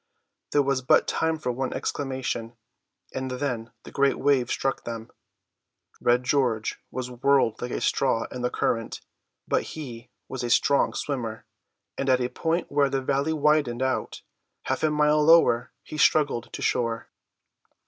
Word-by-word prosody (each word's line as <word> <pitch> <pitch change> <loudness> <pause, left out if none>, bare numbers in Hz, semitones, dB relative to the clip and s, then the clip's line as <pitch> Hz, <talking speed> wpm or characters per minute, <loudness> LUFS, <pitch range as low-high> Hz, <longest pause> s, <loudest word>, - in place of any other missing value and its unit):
There 145 - +4
was 135 -1 0
but 125 - +4
time 160 0 0
for 140 -5 -2
one 130 +1 -3
exclamation, 130 -4 -3 0.6
and 130 0 -3
then 125 -3 -3
the - - -11
great 140 0 +2
wave 135 -3 +2
struck 135 0 -1
them. 115 -1 -6 0.9
Red 120 +1 +3
George 125 -5 0
was 125 0 -5
whirled 125 -2 +2
like 120 - -3
a - - -2
straw 120 -4 +1
in 125 - -5
the 125 - +1
current; 115 -2 -2 0.5
but - - +2 0.2
he 125 -5 -8 0.2
was 130 -2 -5
a 120 - -2
strong 140 +4 +3
swimmer, 120 -6 -4 0.5
and 135 - 0
at 130 -1 +4
a 125 0 -1
point 165 +6 -2
where 140 -1 +3
the 135 - 0
valley 140 +3 0
widened 150 -5 +2
out, 130 0 -2 0.4
half - - -2
a 155 - +3
mile 150 0 +3
lower, 140 -7 +5
he 155 - -7
struggled 140 -6 +2
to - - -6
shore. 115 -1 -1
130 Hz, 160 wpm, -26 LUFS, 120-145 Hz, 0.9 s, lower